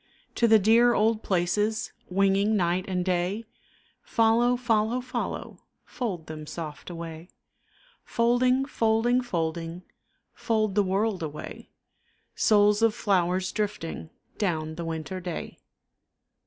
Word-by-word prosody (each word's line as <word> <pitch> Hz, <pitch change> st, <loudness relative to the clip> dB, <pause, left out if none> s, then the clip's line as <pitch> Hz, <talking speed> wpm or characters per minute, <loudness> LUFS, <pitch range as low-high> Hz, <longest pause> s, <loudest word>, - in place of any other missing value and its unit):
To 235 Hz, -, +2 dB
the 220 Hz, 0 st, +7 dB
dear 230 Hz, +4 st, +5 dB
old 220 Hz, +1 st, +2 dB
places 205 Hz, +4 st, 0 dB, 0.2 s
Winging 195 Hz, +3 st, +2 dB
night 180 Hz, 0 st, 0 dB
and 180 Hz, -2 st, -1 dB
day, 185 Hz, +4 st, -1 dB, 0.6 s
Follow, 235 Hz, +2 st, +2 dB
follow, 230 Hz, 0 st, +1 dB
follow, 255 Hz, 0 st, -5 dB, 0.3 s
Fold 200 Hz, -, -4 dB
them 155 Hz, -1 st, -8 dB
soft 155 Hz, -1 st, -7 dB
away; 165 Hz, 0 st, -8 dB, 0.7 s
Folding, 250 Hz, +3 st, +2 dB
folding, 235 Hz, -1 st, +2 dB
folding, 170 Hz, -4 st, -3 dB, 0.5 s
Fold 215 Hz, -3 st, 0 dB
the 205 Hz, -, +3 dB
world 195 Hz, 0 st, 0 dB
away, 155 Hz, -1 st, -7 dB, 0.6 s
Souls 210 Hz, 0 st, +4 dB
of 225 Hz, -2 st, +3 dB
flowers 185 Hz, -2 st, +1 dB
drifting 200 Hz, -7 st, -4 dB, 0.3 s
Down 160 Hz, -6 st, -1 dB
the 170 Hz, +1 st, -6 dB
winter 165 Hz, +3 st, -4 dB
day. 175 Hz, -2 st, -6 dB
200 Hz, 115 wpm, -27 LUFS, 175-225 Hz, 0.7 s, the